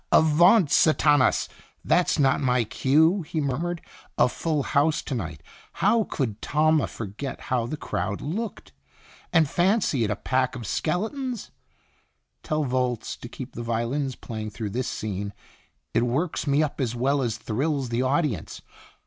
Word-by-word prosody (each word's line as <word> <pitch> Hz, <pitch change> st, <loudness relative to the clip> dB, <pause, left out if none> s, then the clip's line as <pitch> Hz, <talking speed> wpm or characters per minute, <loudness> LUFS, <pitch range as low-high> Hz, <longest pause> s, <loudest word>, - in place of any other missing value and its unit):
"Avaunt 160 Hz, +2 st, +5 dB
Sathanas! 150 Hz, -3 st, +4 dB, 0.4 s
That's 180 Hz, -, +3 dB
not 135 Hz, -3 st, +3 dB
my 125 Hz, -2 st, +2 dB
cue," 155 Hz, -, +3 dB
he 155 Hz, 0 st, -4 dB
muttered. 155 Hz, +5 st, -2 dB, 0.4 s
"A -, -, +5 dB
full 150 Hz, +2 st, -1 dB
house 150 Hz, +2 st, +1 dB
to -, -, -4 dB
night. 80 Hz, -, -5 dB, 0.3 s
How 210 Hz, +4 st, +2 dB
could 110 Hz, -6 st, -3 dB
Talma 155 Hz, 0 st, +2 dB
forget 115 Hz, +5 st, -6 dB
how 120 Hz, -2 st, -1 dB
the 155 Hz, -, -4 dB
crowd 105 Hz, -7 st, -3 dB
looked, 205 Hz, +9 st, -5 dB, 0.6 s
and 160 Hz, -3 st, +4 dB
fancy 175 Hz, -, +2 dB
it 105 Hz, -, 0 dB
a 100 Hz, -, 0 dB
pack 130 Hz, +4 st, 0 dB
of 120 Hz, -2 st, -6 dB
skeletons? 225 Hz, -, -2 dB, 0.9 s
Tell 155 Hz, -1 st, -1 dB
Volz 125 Hz, -3 st, -1 dB
to -, -, -9 dB
keep -, -, -8 dB
the 120 Hz, -, -6 dB
violins 120 Hz, +4 st, -1 dB
playing 110 Hz, -2 st, -6 dB
through 105 Hz, -1 st, -5 dB
this 125 Hz, +4 st, -2 dB
scene, 100 Hz, -1 st, -4 dB, 0.6 s
it 115 Hz, -, +3 dB
works 140 Hz, +8 st, -1 dB
me 145 Hz, +2 st, +3 dB
up 145 Hz, -2 st, -3 dB
as 120 Hz, -2 st, -1 dB
well 135 Hz, +4 st, +1 dB
as 115 Hz, -3 st, -1 dB
thrills 135 Hz, +4 st, -1 dB
the 120 Hz, +1 st, 0 dB
audience. 130 Hz, -, -1 dB
135 Hz, 150 wpm, -25 LUFS, 120-155 Hz, 0.9 s, Avaunt